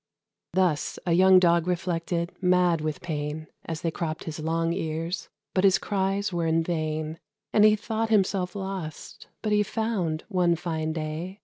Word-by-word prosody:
Thus 180 Hz, -5 st, +1 dB
a 175 Hz, -, +2 dB
young 185 Hz, +2 st, +7 dB
Dog 170 Hz, -1 st, +4 dB
reflected, 170 Hz, -1 st, -1 dB
mad 180 Hz, -3 st, +3 dB
with 155 Hz, -1 st, -3 dB
pain, 155 Hz, -1 st, -3 dB, 0.2 s
As 160 Hz, -1 st, -4 dB
they 165 Hz, -, 0 dB
cropped 160 Hz, -1 st, -3 dB
his 160 Hz, -1 st, -6 dB
long 165 Hz, +1 st, 0 dB
ears, 165 Hz, +1 st, -3 dB, 0.2 s
but 185 Hz, -, +2 dB
his 195 Hz, -1 st, +6 dB
cries 195 Hz, 0 st, -1 dB
were 170 Hz, -1 st, 0 dB
in 165 Hz, 0 st, +2 dB
vain, 155 Hz, -1 st, -2 dB, 0.3 s
And 210 Hz, -, +5 dB
he 215 Hz, 0 st, +6 dB
thought 220 Hz, +1 st, -2 dB
himself 195 Hz, -3 st, +1 dB
lost; 190 Hz, -6 st, -6 dB, 0.2 s
but 215 Hz, -, 0 dB
he 210 Hz, 0 st, +4 dB
found, 205 Hz, -7 st, -1 dB
one 180 Hz, -4 st, +2 dB
fine 160 Hz, -2 st, -2 dB
day. 160 Hz, +5 st, -4 dB
175 Hz, 165 wpm, -26 LUFS, 160-190 Hz, 0.3 s, young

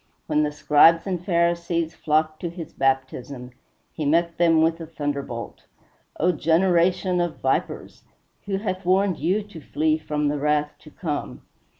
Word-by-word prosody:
When 150 Hz, -1 st, +1 dB
the 150 Hz, -1 st, 0 dB
Scribes 150 Hz, +3 st, +4 dB
and 180 Hz, -3 st, -3 dB
Pharisees 170 Hz, -2 st, 0 dB
flocked 155 Hz, 0 st, 0 dB
to 175 Hz, -, -4 dB
his 170 Hz, -1 st, -9 dB
baptism, 130 Hz, -1 st, -2 dB, 0.4 s
he 155 Hz, -, -4 dB
met 170 Hz, +3 st, +1 dB
them 165 Hz, -2 st, +4 dB
with 165 Hz, +1 st, 0 dB
a 165 Hz, -, -7 dB
thunderbolt: 140 Hz, -6 st, -5 dB, 0.5 s
"O 180 Hz, +3 st, +3 dB
generation 175 Hz, +3 st, +2 dB
of 175 Hz, -2 st, -2 dB
vipers! -, -, -2 dB, 0.4 s
who 195 Hz, -1 st, -1 dB
hath 190 Hz, -2 st, -4 dB
warned 185 Hz, 0 st, +2 dB
you 200 Hz, +5 st, 0 dB
to 200 Hz, -6 st, -12 dB
flee 155 Hz, +3 st, 0 dB
from 150 Hz, -1 st, -2 dB
the 145 Hz, 0 st, -1 dB
wrath 150 Hz, 0 st, +1 dB
to 155 Hz, -, -15 dB
come?" 150 Hz, -3 st, -5 dB
165 Hz, 155 wpm, -23 LUFS, 150-175 Hz, 0.5 s, Scribes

